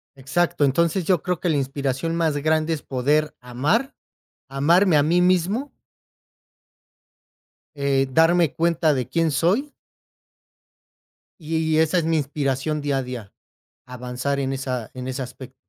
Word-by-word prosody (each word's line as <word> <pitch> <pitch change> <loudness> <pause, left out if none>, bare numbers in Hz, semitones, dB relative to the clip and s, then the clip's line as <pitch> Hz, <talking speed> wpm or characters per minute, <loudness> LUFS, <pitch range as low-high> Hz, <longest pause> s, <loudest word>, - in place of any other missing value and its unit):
Exacto, 145 +4 0
entonces 170 +6 +1
yo 180 -2 +2
creo 180 -2 -2
que 175 - -1
la 150 - +2
inspiración 140 +3 -2
más 160 -3 0
grande 155 +2 +1
es 150 - -4
poder 145 +4 0
amar, 145 - -1 0.6
amarme 165 +5 +3
a 145 - +4
mí 175 +4 +2
mismo 185 - +1 2.0
Eh, 140 -1 +1
darme 165 +2 +3
cuenta 165 -1 +2
de 130 -3 -2
quién 165 -1 0
soy 195 - +1 1.7
y 160 0 -1
esa 160 +3 +3
es - - -1
mi 165 0 +1
inspiración 145 +1 -2
día 140 -1 -1
a 135 - -1
día, 125 -5 -8 0.5
avanzar 125 +2 -4
en 135 -1 -1
esa 130 -4 -4
en 130 0 -7
ese 130 +1 -4
aspecto. 130 +1 -9
150 Hz, 140 wpm, -23 LUFS, 135-170 Hz, 2.0 s, a